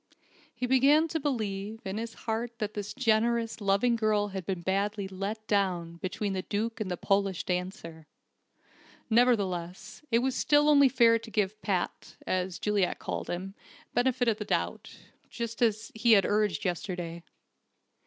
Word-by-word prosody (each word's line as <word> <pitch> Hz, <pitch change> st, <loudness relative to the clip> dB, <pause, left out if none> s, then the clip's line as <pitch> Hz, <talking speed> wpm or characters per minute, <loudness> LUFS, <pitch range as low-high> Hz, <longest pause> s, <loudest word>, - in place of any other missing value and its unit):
He 245 Hz, +2 st, -2 dB
began 275 Hz, +5 st, +4 dB
to 320 Hz, -, -1 dB
believe, 220 Hz, -6 st, -3 dB
in 195 Hz, +2 st, -3 dB
his 230 Hz, 0 st, -6 dB
heart, 230 Hz, +1 st, -2 dB
that 215 Hz, -2 st, -3 dB
this 205 Hz, -1 st, -5 dB
generous, 230 Hz, -2 st, +1 dB
loving 200 Hz, +5 st, +2 dB
girl 215 Hz, -2 st, +1 dB
had 190 Hz, -3 st, -6 dB
been 185 Hz, -3 st, -2 dB
badly 200 Hz, +2 st, -1 dB
"let 200 Hz, +3 st, -5 dB
down," 180 Hz, -5 st, 0 dB
between 195 Hz, +3 st, -3 dB
the 190 Hz, -, -2 dB
Duke 220 Hz, +4 st, -3 dB
and 200 Hz, -, -2 dB
the 180 Hz, -, -2 dB
Polish 195 Hz, -1 st, 0 dB
dancer. 180 Hz, -3 st, -4 dB, 1.0 s
Nevertheless, 205 Hz, -4 st, +1 dB
it 230 Hz, -, +3 dB
was 265 Hz, -, 0 dB
still 295 Hz, 0 st, +4 dB
only 280 Hz, -2 st, +6 dB
fair 230 Hz, -3 st, +5 dB
to 225 Hz, 0 st, -11 dB
give 210 Hz, -1 st, -1 dB
"Pat" 190 Hz, -4 st, -2 dB
(as 185 Hz, -1 st, -1 dB
Juliet 205 Hz, -3 st, 0 dB
called -, -, -5 dB
him) 185 Hz, +2 st, -4 dB, 0.4 s
the -, -, +3 dB
benefit 250 Hz, -1 st, +1 dB
of 220 Hz, -2 st, +2 dB
the 210 Hz, -, -4 dB
doubt, -, -, -2 dB, 0.3 s
just 235 Hz, 0 st, -5 dB
as 220 Hz, -1 st, +1 dB
he 225 Hz, +1 st, +4 dB
had 200 Hz, -2 st, +5 dB
urged 205 Hz, -6 st, +1 dB
yesterday. 175 Hz, -1 st, -3 dB
210 Hz, 160 wpm, -29 LUFS, 190-230 Hz, 1.0 s, only